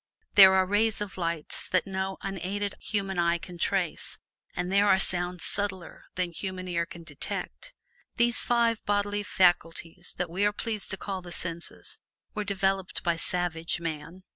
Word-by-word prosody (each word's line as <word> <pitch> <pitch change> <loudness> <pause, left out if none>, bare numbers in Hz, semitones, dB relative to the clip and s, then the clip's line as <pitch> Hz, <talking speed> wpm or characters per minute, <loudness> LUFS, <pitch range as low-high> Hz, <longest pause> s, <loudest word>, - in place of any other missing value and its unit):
There 190 -1 +9
are 190 0 +4
rays 205 +3 +2
of 210 -2 -4
light 170 -3 -3 0.2
that 185 -2 +2
no 190 0 -3
unaided 195 +1 -3
human 195 -3 -2
eye 170 0 +3
can 175 0 -10
trace, 185 -3 -1 0.4
and 180 - -2
there 200 +1 +4
are 190 - +6
sounds 180 -2 +5
subtler 195 -3 -4
than 180 -1 -1
human 185 +1 -5
ear 170 -1 -1
can 170 - -10
detect. 140 - -6 0.4
These 235 0 +3
five 235 -2 +2
bodily 205 0 0
faculties 175 -3 +1
that 180 -2 -2
we 190 +4 0
are 205 - +4
pleased 215 -1 -3
to 195 - -1
call 190 0 -4
the 175 -1 -10
senses 170 0 -4 0.3
were 210 - -2
developed 195 -1 -1
by 170 -2 +2
savage 170 -1 -1
man. 165 +2 -6
185 Hz, 165 wpm, -28 LUFS, 175-200 Hz, 0.4 s, There